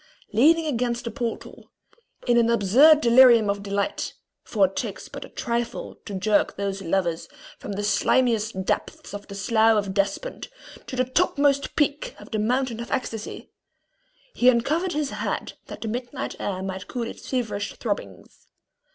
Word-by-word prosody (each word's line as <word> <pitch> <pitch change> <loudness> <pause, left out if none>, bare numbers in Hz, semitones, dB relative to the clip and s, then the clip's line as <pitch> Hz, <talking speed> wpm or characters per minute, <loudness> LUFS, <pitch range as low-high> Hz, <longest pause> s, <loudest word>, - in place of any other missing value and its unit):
Leaning 320 +9 +5
against 245 -4 -1
the 235 - -4
portal, 235 0 -5 0.6
in 240 - +3
an 235 -1 +4
absurd 245 +9 +6
delirium 235 -4 +6
of 200 0 -4
delight 200 +6 -2 0.3
for 205 -4 +2
it 190 +1 -5
takes - - -4
but - - -8
a - - -11
trifle 235 -1 -3
to 205 - -6
jerk 205 +2 +1
those 200 -1 -3
lovers 170 -2 -1 0.3
from 205 - -6
the 205 +1 -3
slimiest 220 -3 +1
depths - - -3
of 205 0 -7
the 200 - -8
Slough 220 +2 +3
of 200 -2 -1
Despond 200 - -2 0.4
to - - -5
the 255 0 +1
topmost 280 0 +1
peak 295 0 0
of - - -13
the 215 - -1
mountain 245 +1 0
of 235 - -6
ecstasy 225 -4 -4 0.8
he 250 - +5
uncovered 310 +10 +1
his 295 -2 -1
head - - -3
that - - -9
the 240 +3 -3
night - - -5
air 190 -2 -3
might 190 0 -5
cool 245 - -3
its - - -9
feverish 220 -6 -2
throbbings. 100 - -6
230 Hz, 160 wpm, -24 LUFS, 200-255 Hz, 0.8 s, absurd